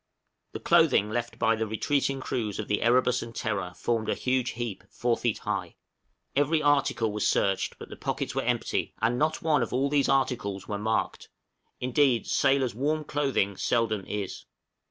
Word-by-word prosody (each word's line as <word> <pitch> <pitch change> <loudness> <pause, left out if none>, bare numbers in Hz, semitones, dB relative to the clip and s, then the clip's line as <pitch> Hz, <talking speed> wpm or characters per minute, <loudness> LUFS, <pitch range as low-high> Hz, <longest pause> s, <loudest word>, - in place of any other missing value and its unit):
The - - -5
clothing 105 +1 +4
left 115 0 -3
by 115 -1 +3
the 110 0 -2
retreating 135 +5 0
crews 110 -6 -3
of - - -4
the 105 - 0
'Erebus' 125 +1 +3
and 115 0 -8
'Terror' 100 -6 -3
formed 110 +3 -1
a - - +1
huge 130 -1 0
heap 120 -5 -4
four 120 -1 0
feet 120 -3 -1
high; - - -4 0.6
every 145 +3 +3
article 140 -6 +2
was 105 0 0
searched, 95 -1 +1
but - - -10
the - - -8
pockets - - -3
were - - 0
empty, - - -1
and 120 +3 +1
not 155 +1 0
one 155 -2 +3
of - - -2
all 135 +3 +1
these 145 -2 +2
articles 120 -8 0
were 100 -1 -3
marked, 110 +1 -1 0.5
indeed 125 -1 +2
sailors' 135 -3 +2
warm 150 +6 -1
clothing 135 -10 0
seldom 115 -4 0
is. 100 -2 -4
120 Hz, 175 wpm, -27 LUFS, 110-135 Hz, 0.6 s, clothing